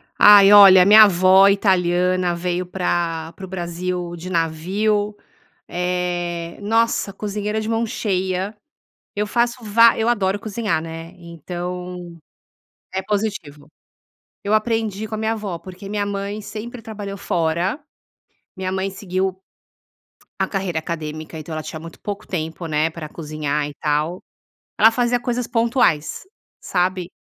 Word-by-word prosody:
Ai 205 -1 +8
olha, 195 -2 +9
a - - +1
minha 215 +2 +9
avó 190 0 +6
italiana 180 -2 +2
veio 180 +1 -2
pra 170 -3 -2
para 190 - -8
o - - -11
Brasil 175 -1 -4
de 175 +2 -8
navio, 195 +6 0 0.5
eh, 175 -1 -3
nossa 225 -1 +1
cozinheira 210 +1 -3
de 215 - -4
mão 230 0 0
cheia. 190 -2 -2 0.6
Eu 210 +1 0
faço 240 +2 0
vá 230 +2 +5
eu 225 - 0
adoro 205 -4 +1
cozinhar, 210 -5 -2
né, 165 +1 -8
então 175 +1 -7 0.8
é 190 - -1
positivo. 195 -8 -3 0.8
Eu 205 - 0
aprendi 220 -1 0
com 215 - -5
a - - -5
minha 220 +1 0
avó, 205 -5 -5
porque 185 +2 -10
minha 205 0 -1
mãe 200 +1 -4
sempre 225 +3 -8
trabalhou 205 -3 -7
fora. 170 - -1 0.8
Minha 185 0 -3
mãe 190 +1 -1
seguiu 190 -1 -3 1.0
a - - +1
carreira 190 -5 -2
acadêmica, 155 -1 -6
então 155 +1 -9
ela 155 0 -4
tinha 155 - -7
muito 165 +1 -11
pouco 205 0 -6
tempo, 165 -1 -4
né, 155 0 +1
pra 165 -1 -8
cozinhar 150 -2 -3
e 145 - -9
tal, 155 +4 -1 0.6
ela 220 +2 +7
fazia 245 +1 +1
coisas 245 0 -2
pontuais, 230 - +1 0.4
sabe? 180 -1 -1
185 Hz, 140 wpm, -21 LUFS, 170-210 Hz, 1.0 s, olha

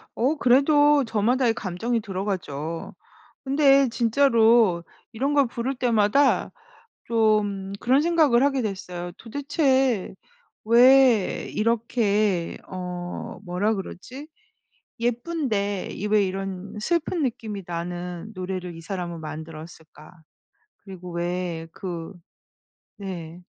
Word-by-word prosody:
어 265 +7 +1
그래도 290 +2 +4
저마다의 230 +3 +1
감정이 225 +4 -2
들어가죠. 185 -6 -4 0.5
근데 275 -1 +4
진짜로 230 -6 +3 0.3
이런 270 +6 -1
걸 280 -3 +4
부를 240 +3 -3
때마다 245 +2 +2 0.5
좀 210 -4 +1
그런 260 +6 +3
생각을 310 -7 +3
하게 275 -2 +2
됐어요. 180 -4 -5
'도대체 265 - 0 0.5
왜 245 -1 +5
이렇게' 215 -5 0
어 180 -1 -6
뭐라 195 +5 0
그러지? 250 +8 -8 0.7
'예쁜데 235 - -1
이 210 - -4
왜 210 -1 +3
이런 195 +1 -5
슬픈 340 +4 0
느낌이 220 -5 -3
나는 175 +3 -5
노래를 185 -2 -5
이 165 - -9
사람은 170 -1 -5
만들었을까.' 155 0 -10 0.7
그리고 185 -3 -9
왜 175 -1 -3
그 175 -1 -6 0.9
네. 175 -3 -7
210 Hz, 215 characters per minute, -24 LUFS, 180-255 Hz, 0.9 s, 왜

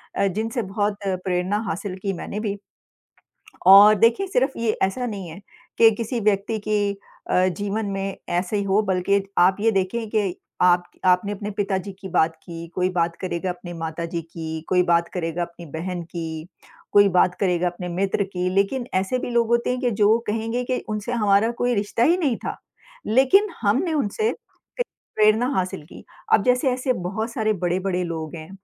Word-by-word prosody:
अ, 200 - +2
जिनसे 225 +4 -2
बहुत 205 0 0
प्रेरणा 185 +1 -1
हासिल 185 +2 -4
की 195 - -1
मैंने 200 +3 -5
भी। 205 -2 -3 1.1
और 200 +3 +10
देखिए 230 - +3
सिर्फ़ 270 -7 0
ये 230 -1 +1
ऐसा 220 +7 0
नहीं 195 -6 -5
है 160 - -9 0.4
के 225 -1 +8
किसी 230 +2 -3
व्यक्ति 210 +1 +1
की 205 -1 +1 0.4
अ, 185 0 +4
जीवन 205 +4 -3
में 195 0 -3
ऐसा 180 +4 -1
ही 200 - 0
हो 200 +2 +3
बल्कि 195 0 +1 0.2
आप 185 +2 +5
ये 225 +2 +3
देखें 200 +4 -1
के 210 -4 +1 0.3
आप 175 0 +4 0.2
आपने 200 +3 +1
पिताजी 195 -1 -2
की 190 - -7
बात 160 0 +3
की 170 -1 -8
कोई 180 0 +1
बात 170 -1 0
करेगा 180 0 -2
अपने 175 0 -7
माताजी 165 +1 -4
की, 160 -1 -6
कोई 180 -1 +4
बात 170 -1 +2
करेगा 170 -1 -2
अपनी 170 0 -8
बहन 170 +4 -5
की, 165 -1 -6 0.4
कोई 205 0 +6
बात 180 -1 +3
करेगा 180 -2 +1
अपने 180 +1 -6
मित्र 190 +3 0
की 180 0 -1
लेक़िन 220 +6 +1
ऐसे 190 +7 0
भी 245 - -4
लोग 235 -1 +2
होते 235 +1 +1
हैं 250 0 -1
कि 245 -2 +1
जो 220 +3 +5
कहेंगे 225 +3 -2
कि 250 0 -1
उनसे 215 +3 -3
हमारा 210 -1 +3
कोई 245 0 +2
रिश्ता 205 +3 -1
ही 335 +7 +5
नहीं 275 -9 +1
था। - - -3 0.5
लेक़िन 270 - +4
हमने 250 - +1
उनसे 305 - 0
क - - -10 0.8
प्रेरणा 215 +3 +4
हासिल 185 -2 -2
की। - - -13 0.3
अब 200 - +5
जैसे 250 +2 +3
ऐसे 255 +1 0
बहुत 210 +3 -3
सारे 220 -3 +1
बड़े-बड़े 180 +1 0
लोग 160 -2 -5
हैं 155 +1 -9
195 Hz, 180 wpm, -23 LUFS, 180-225 Hz, 1.1 s, और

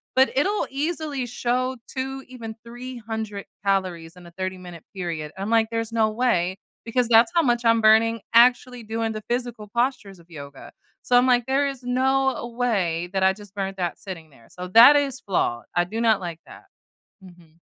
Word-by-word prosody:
but 265 +1 +4
it'll 400 +8 +1
easily 290 -1 -3
show 250 +2 -1
2, 270 0 -5
even 230 -3 -8
300 225 -4 -6 0.2
calories 185 -4 -1
in 180 - -14
a - - -14
30 185 0 -4
minute 175 -2 -11
period. 165 -5 -4
I'm 200 +3 -3
like, 225 -1 +3
"There's 225 0 -3
no 220 -1 +1
way, 195 -6 0 0.3
because 235 +1 0
that's 235 +7 +5
how 340 - +5
much 240 -5 0
I'm 230 0 +4
burning 220 0 +4
actually 245 0 +4
doing 225 +1 -2
the 215 -1 -7
physical 240 -3 -3
postures 235 -6 -1
of 170 +1 -21
yoga," 140 -4 -11 0.3
so, 245 - +3
I'm 245 - +5
like, 245 -2 +3
"There 275 +2 +2
is 270 -2 -6
no 260 0 0
way 180 -8 -1
that 190 -1 0
I 190 0 +4
just 205 0 -15
burnt 195 -1 -4
that 175 -2 -2
sitting 170 -5 -9
there," 115 -5 -21
so 180 0 -7
that 235 +9 +9
is 275 -3 0
flawed. 145 - -1
I 175 - +3
do 220 +5 -5
not 225 -3 +3
like 170 -2 -6
that. - - -14 0.6
Mhm. 170 -3 -18
225 Hz, 185 wpm, -23 LUFS, 185-250 Hz, 0.6 s, that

